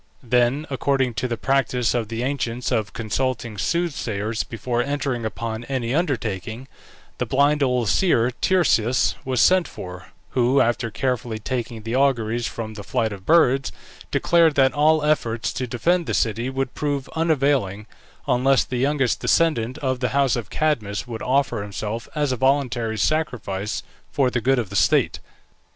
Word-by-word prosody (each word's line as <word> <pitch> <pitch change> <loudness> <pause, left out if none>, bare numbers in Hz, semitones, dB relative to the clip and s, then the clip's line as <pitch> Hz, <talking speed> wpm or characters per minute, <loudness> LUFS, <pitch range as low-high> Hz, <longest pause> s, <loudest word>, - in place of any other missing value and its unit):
Then, 125 +4 +2
according 135 -2 +1
to 125 - 0
the 120 -1 -3
practice 130 -3 +1
of 120 -3 -1
the 115 +2 -4
ancients 125 -3 -2
of 110 -2 0
consulting 115 -1 -2
soothsayers 115 -11 -1
before 120 +2 -2
entering 135 -3 -2
upon 110 +1 -4
any 125 -2 -2
undertaking, 120 - -2 0.5
the - - -1
blind 145 +2 +2
old 125 -4 +1
seer 125 - +3
Tiresias 125 -6 +2
was 130 -2 -1
sent 185 -1 +4
for, 90 0 -9 0.2
who, 130 +2 +3
after 115 0 +1
carefully 120 0 -2
taking 115 0 -4
the 115 +2 -3
auguries 120 -4 +1
from 110 -2 -6
the 105 -1 -8
flight 110 +1 -1
of 95 -1 -11
birds, 135 -5 +4 0.4
declared 165 -3 +3
that 135 -1 +4
all 150 +1 +3
efforts 120 -7 0
to 125 - -3
defend 170 +8 0
the - - -1
city 115 +3 0
would 135 -1 -3
prove 145 -3 -2
unavailing, 140 - 0 0.4
unless 130 +2 +3
the 125 - -4
youngest 135 0 +1
descendant 130 -7 +1
of 130 -1 0
the 125 -1 0
house 140 -2 +2
of 115 -3 -5
Cadmus 115 -11 -1
would 115 -2 -7
offer 130 -4 +1
himself 105 +2 -5
as 145 -3 0
a 125 - -1
voluntary 125 -4 +1
sacrifice 105 -8 -1 0.3
for 130 -3 +1
the 120 - -1
good 135 +3 +2
of 110 -6 -2
the - - -6
state. - - +2
125 Hz, 160 wpm, -23 LUFS, 115-140 Hz, 0.5 s, sent